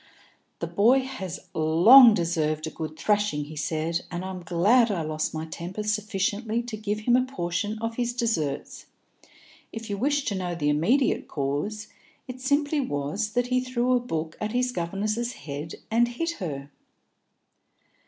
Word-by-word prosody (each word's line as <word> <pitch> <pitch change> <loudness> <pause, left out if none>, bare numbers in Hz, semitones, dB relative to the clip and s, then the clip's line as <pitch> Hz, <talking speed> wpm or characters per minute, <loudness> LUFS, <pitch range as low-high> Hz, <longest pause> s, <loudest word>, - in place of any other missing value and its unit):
"The - - -3
boy 240 +6 +4
has 195 -10 -6
long 210 +10 +8
deserved 160 -3 0
a 160 - -5
good 155 0 -6
thrashing," 205 -8 +1
he 155 +2 -10
said, 160 +3 -1
"and 175 +1 -4
I'm 190 -1 -6
glad 200 +9 +3
I 180 -6 -1
lost 155 0 -2
my 160 0 -4
temper 175 +6 -6
sufficiently 210 +2 -1
to 240 -2 -6
give 210 0 -3
him 240 +3 +3
a 255 - +5
portion 205 -4 -3
of 225 +1 -4
his 240 -1 0
deserts. 200 - -2 0.8
If 225 -1 -7
you 200 - -3
wish 285 +3 +1
to 205 - -1
know 180 -2 -3
the 145 -3 0
immediate 220 - +2
cause, 150 +10 -3 0.4
it 255 0 -8
simply 285 +3 +1
was 200 - -2
that 245 0 0
he 255 - +3
threw 255 0 0
a 250 - +4
book 165 -9 -4
at 215 +1 -2
his 250 0 +1
governess's 215 +6 -2
head 145 - -7 0.2
and 235 +2 +4
hit 330 +8 -2
her." 140 -5 -5
205 Hz, 165 wpm, -26 LUFS, 160-240 Hz, 0.8 s, long